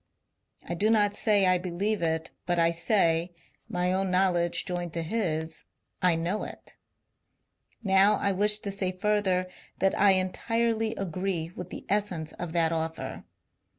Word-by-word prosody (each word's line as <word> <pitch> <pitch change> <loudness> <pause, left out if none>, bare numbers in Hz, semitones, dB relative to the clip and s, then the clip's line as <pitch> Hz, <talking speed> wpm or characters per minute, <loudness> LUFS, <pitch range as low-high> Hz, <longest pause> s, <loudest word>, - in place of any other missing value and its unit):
I 175 - -3
do 205 +6 +1
not 205 -2 +3
say 205 -3 +3
I 185 -1 +3
believe 190 +4 -2
it, 160 -1 -1 0.2
but 175 -1 +1
I 165 0 +3
say 170 -1 +1 0.2
— - - -38
my 180 +1 +1
own 190 0 0
knowledge 180 -2 +2
joined 175 -2 -4
to 165 - -2
his 160 -4 -2 0.2
— - - -48
I - - +2
know 175 +6 -1
it - - -9 1.1
Now 195 +1 +5
I 200 - 0
wish 210 +2 +3
to 200 - -3
say 195 -2 -2
further 190 -2 0 0.3
that 195 - +2
1 200 -1 +5
entirely 225 +4 0
agree 180 -2 -3
with 180 0 -7
the - - -8
essence 190 -6 -1
of 175 -2 -4
that 165 -2 +2
offer. 160 0 -4
185 Hz, 160 wpm, -27 LUFS, 170-205 Hz, 1.1 s, Now